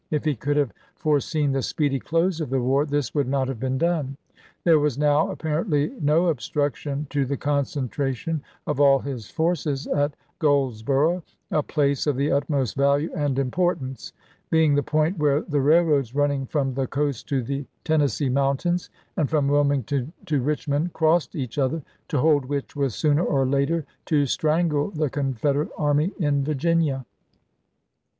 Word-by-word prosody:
If 150 0 -1
he 155 - +2
could 145 +6 -1
have 140 -8 +1 0.2
fore 150 -2 +2
seen 145 0 -1
the 135 0 0
speedy 140 +1 0
close 165 +3 0
of 150 - -3
the 135 0 +1
war 135 +4 +1
this 145 -3 -1
would 145 -4 +1
not 135 0 0
have 130 -4 -4
been 130 +1 -1
done. 150 -4 0 0.5
There 165 -3 +5
was 145 -3 0
now 150 +4 +3
apparently 160 -2 -1
no 155 +4 +3
obstruction 145 0 -2
to 145 -1 +1
the 135 +1 -2
concentration 140 - -2 0.2
of 150 - -2
all 140 -1 +6
his 130 -6 -6
forces 160 -4 -1
at 145 0 0 0.2
Goldsboro', 140 +3 +2 0.3
a 155 - +2
place 140 -1 0
of 145 - +2
the 140 +3 0
utmost 140 -3 0
value 140 +3 +2
and 145 -5 0
impor 175 +7 +1
tance; 130 -2 -7 0.4
being 160 -2 +4
the 145 - +3
point 155 +5 0
where 145 0 +3
the 145 -3 -1
railroads 145 -4 +3
running 140 -2 +1
from 135 -2 -1
the 130 0 -1
coast 140 -2 -2
to 135 -3 0
the 140 +3 -4 0.2
Tennessee 150 -2 +1
mountains, 140 +7 0 0.3
and 150 - 0
from 150 -3 +1
Wilmington 140 -1 +1
to 145 -4 0
Richmond, 150 +4 -1
crossed 160 -3 +2
each 130 -1 -4
other 145 +3 0
— - - -43
to 145 - 0
hold 145 0 +3
which 140 +1 -4
was 140 -5 -1
sooner 150 +1 +2
or 135 -5 +1
later 140 +4 +1 0.2
to 145 -3 +3
strangle 155 +3 +1
the 155 -7 -2
Confederate 140 +1 0
army 150 +4 +2
in 145 -5 +1
Virginia. 150 -2 0
145 Hz, 170 wpm, -24 LUFS, 135-155 Hz, 0.5 s, all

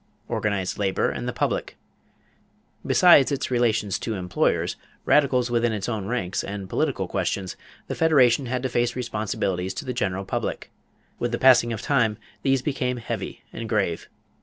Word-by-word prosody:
=Organized 100 -3 -2
Labor 95 -2 +1
and - - -5
the - - 0
Public.= - - -2 1.1
Besides 160 -6 +6
its 140 -1 -2
relations 115 -5 +1
to 110 - -3
employers, 90 -2 0 0.3
radicals 125 -4 +3
within 120 -1 +2
its 100 -2 -3
own 110 -5 -3
ranks, 100 -6 -2
and 100 -1 -5
political - - -1
questions, 95 -2 -2 0.3
the - - -4
Federation 135 -5 +4
had 125 +1 -2
to 130 - 0
face 120 0 0
responsibilities 105 -6 -2
to - - -5
the 125 - -3
general 95 -4 -2
public. - - -3 0.5
With 120 - -1
the 120 - 0
passing 125 -2 +5
of 110 - -4
time 115 -7 +2 0.2
these 135 -2 +1
became 125 -3 -1
heavy 120 - -5
and 115 -1 -6
grave. 100 -7 -1
120 Hz, 160 wpm, -24 LUFS, 100-125 Hz, 1.1 s, Besides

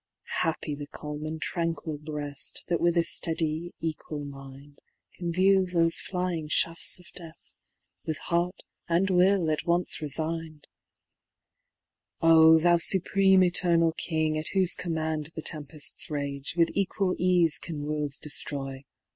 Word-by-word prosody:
Happy 160 -2 -2
the 145 0 -7
calm 150 0 -7
and 160 +1 -6
tranquil 165 -3 -3
bread. 150 -1 -6 0.4
That 170 - -1
with 170 0 +1
a - - +5
fteady 165 0 0
equal 155 -2 -5
mind. 140 +1 -13 0.3
Can 170 -1 -5
view 190 +2 +3
thofe 165 -1 +2
flying 180 -4 -4
fhafts 165 +3 +3
of 180 - -15
death, 165 -2 -11 0.5
With 160 -1 -4
heart 175 +2 -2 0.3
and 180 +3 +1
will 180 -2 +3
at 155 - -3
once 175 +1 +3
refign'd 155 +1 0
f‚Äî 165 - -13
‚Ä¢ 165 - +7
Oh! 160 0 +7
thou 175 +1 +3
Supreme 190 +1 +4
Eternal 170 -2 +3
King, 155 -1 -2
At 155 - -3
whofe 185 -2 +5
command 160 -3 -3
tfcte 160 - -5
tempcfts 150 -1 -2
rage>. 140 -1 -4
With 170 -1 +2
equal 195 -1 -1
eafe 175 -3 +4
can 155 -4 -6
worlds 150 -1 -2
deftroy. 135 -2 -4
165 Hz, 140 wpm, -26 LUFS, 150-175 Hz, 0.5 s, Ä¢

